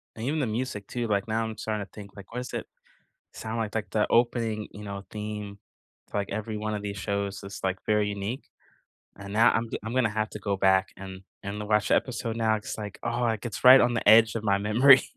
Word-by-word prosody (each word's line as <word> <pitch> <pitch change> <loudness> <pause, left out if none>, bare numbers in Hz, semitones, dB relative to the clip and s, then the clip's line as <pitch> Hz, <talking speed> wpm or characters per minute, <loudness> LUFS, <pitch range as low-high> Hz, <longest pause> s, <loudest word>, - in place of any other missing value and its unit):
And 110 - -5
even 150 +4 0
the 135 - 0
music 110 -3 -3
too, 120 -1 -3
like, 100 -1 0
now 110 +1 0
I'm 110 -1 -6
starting 105 -2 -3
to - - -25
think, 100 -2 -10
like, 100 -2 -12
what 125 - -4
does 125 - -7
it - - -3 0.7
sound 110 +1 -5
like? 110 -2 -3
Like, 110 -2 -3
the 105 - +2
opening, 115 -3 +1
you 105 0 -10
know, 100 -1 -6
theme 105 -1 -6 0.5
to, - - -4
like, 100 -1 -1
every 110 +1 -3
one 110 0 -2
of 105 - -4
these 100 -1 -4
shows 100 0 -3
is, 100 +1 -8
like, 95 0 0
very 105 -1 +2
unique. 105 +6 -4 0.7
And 100 0 -9
now 115 +3 +5
I'm 115 +1 0
g - - -3
I'm 115 - -4
gonna 125 -4 +2
have 110 +1 -2
to - - -7
go 100 -2 -1
back 95 0 +3
and 95 -1 -9 0.2
and 105 +1 -5
watch 105 -1 +2
a - - +6
episode 115 -3 -2
now 110 -1 +2
'cause, 105 - -6
like 105 -2 -7
oh, 120 +1 -1
like, 110 -2 0
it's 120 -1 -5
right 130 +1 +10
on 120 0 +3
the 115 - -2
edge 110 +1 +7
of 110 - -4
my 100 -2 +3
memory. 120 +7 +6
105 Hz, 245 wpm, -27 LUFS, 100-115 Hz, 0.7 s, right